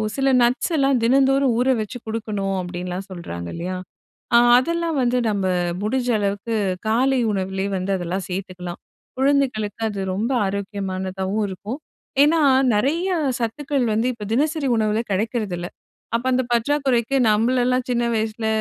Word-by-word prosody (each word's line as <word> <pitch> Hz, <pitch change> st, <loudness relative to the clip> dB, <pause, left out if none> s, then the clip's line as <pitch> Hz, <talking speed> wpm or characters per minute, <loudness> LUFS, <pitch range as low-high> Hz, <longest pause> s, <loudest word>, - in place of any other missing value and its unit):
சில 270 Hz, 0 st, +2 dB
நட்ஸ் 250 Hz, +8 st, +1 dB
எல்லாம் 275 Hz, -2 st, +3 dB
தினந்தோறும் 270 Hz, +1 st, +3 dB
ஊற 255 Hz, +2 st, +2 dB
வச்சு 215 Hz, +4 st, -5 dB
குடுக்கணும் 210 Hz, -3 st, -2 dB
அப்படின்னுலாம் 180 Hz, +1 st, -5 dB
சொல்றாங்க 85 Hz, -, -6 dB
இல்லையா? 180 Hz, +2 st, -4 dB, 0.6 s
அ -, -, +9 dB, 0.2 s
அதெல்லாம் 335 Hz, +2 st, -1 dB
வந்து 245 Hz, +1 st, +2 dB
நம்ம 195 Hz, -2 st, -1 dB, 0.4 s
முடிஞ்ச 250 Hz, +3 st, 0 dB
அளவுக்கு, 205 Hz, +3 st, -2 dB, 0.3 s
காலை 260 Hz, +4 st, +2 dB
உணவிலயே 190 Hz, +1 st, -2 dB
வந்து 185 Hz, +2 st, -2 dB
அதெல்லாம் 180 Hz, +1 st, -3 dB
சேத்துக்கலாம். 180 Hz, -1 st, -5 dB, 0.4 s
குழந்தைகளுக்கு 260 Hz, -6 st, +1 dB
அது 200 Hz, -1 st, -5 dB, 0.2 s
ரொம்ப 225 Hz, +6 st, -1 dB
ஆரோக்கியமானதாவும் 195 Hz, 0 st, -3 dB
இருக்கும். 210 Hz, +9 st, -6 dB, 0.4 s
ஏன்னா, 320 Hz, +2 st, +4 dB, 0.3 s
நெறைய 315 Hz, -, +1 dB, 0.3 s
சத்துக்கள் 270 Hz, +3 st, -1 dB
வந்து 225 Hz, +3 st, +1 dB
இப்போ 215 Hz, -3 st, -8 dB
தினசரி 300 Hz, +2 st, +1 dB
உணவுல 215 Hz, 0 st, +1 dB
கெடைக்கிறதில்ல. 195 Hz, -4 st, -2 dB, 0.5 s
அப்போ 235 Hz, -, -2 dB
அந்த 255 Hz, +1 st, +2 dB
பற்றாக்குறைக்கு, 265 Hz, 0 st, +1 dB, 0.2 s
நம்மளெல்லாம் 250 Hz, +3 st, +2 dB
சின்ன 240 Hz, -1 st, +1 dB
வயசில 220 Hz, 0 st, -2 dB
225 Hz, 130 wpm, -22 LUFS, 195-260 Hz, 0.6 s, அ